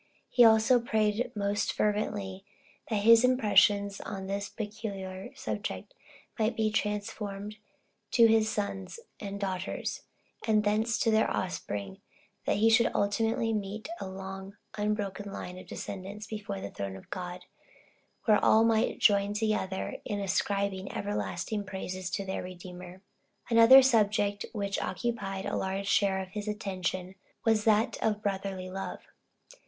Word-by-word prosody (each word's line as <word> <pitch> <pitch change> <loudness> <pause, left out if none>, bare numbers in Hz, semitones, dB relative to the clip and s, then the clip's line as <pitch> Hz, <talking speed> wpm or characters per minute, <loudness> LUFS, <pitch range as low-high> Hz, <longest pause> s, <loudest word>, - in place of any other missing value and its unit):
He 245 - +6
also 225 +2 +6
prayed 220 -1 0
most 205 +1 0
fervently, 205 -2 -1 0.5
that 210 -3 0
his 230 +2 +8
impressions 205 -5 +4
on 195 -2 -6
this 200 +1 -3
particular 205 -2 -6
subject - - -5 0.5
might 220 +2 +1
be 215 -1 +1
transferred 210 -1 -3 0.5
to 235 - +6
his 220 -1 +4
sons 200 - -3 0.2
and 200 -1 -5
daughters, 190 -1 -3 0.5
and 215 -1 +4
thence 220 +2 +1
to 225 - +2
their 220 0 +3
offspring, 100 - -3
so - - -33 0.5
that - - +2
he 220 +2 +4
should 230 +1 +5
ultimately 225 +3 +1
meet 210 +4 -4
a - - -5
long 190 +1 -8 0.2
unbroken 205 -1 -2
line 180 -1 -6
of - - -12
descendants 200 +2 -6
before 210 - -5
the 100 - -6
throne 100 -1 -5
of 95 - -13
God, 180 0 -6 0.8
where 215 -2 +4
all 220 +1 +6
might 225 0 +2
join 200 -1 +3
together 210 -3 -1
in 205 - -3
ascribing 195 0 -1
everlasting 105 - -3
praises 185 -1 -5
to 195 +2 -3
their 190 - -3
Redeemer. 180 +1 -9 0.5
Another 235 +4 +9
subject, 205 -4 +2
which 200 -2 -2
occupied 195 -3 -3
a - - -2
large 190 +1 -2
share 195 -1 +2
of 190 -1 -5
his 210 +1 -6
attention, 185 -3 -3 0.3
was 220 -2 +3
that 220 +1 +3
of 215 -1 0
brotherly 195 -2 -2
love. 195 +1 -5
205 Hz, 140 wpm, -30 LUFS, 190-220 Hz, 0.8 s, Another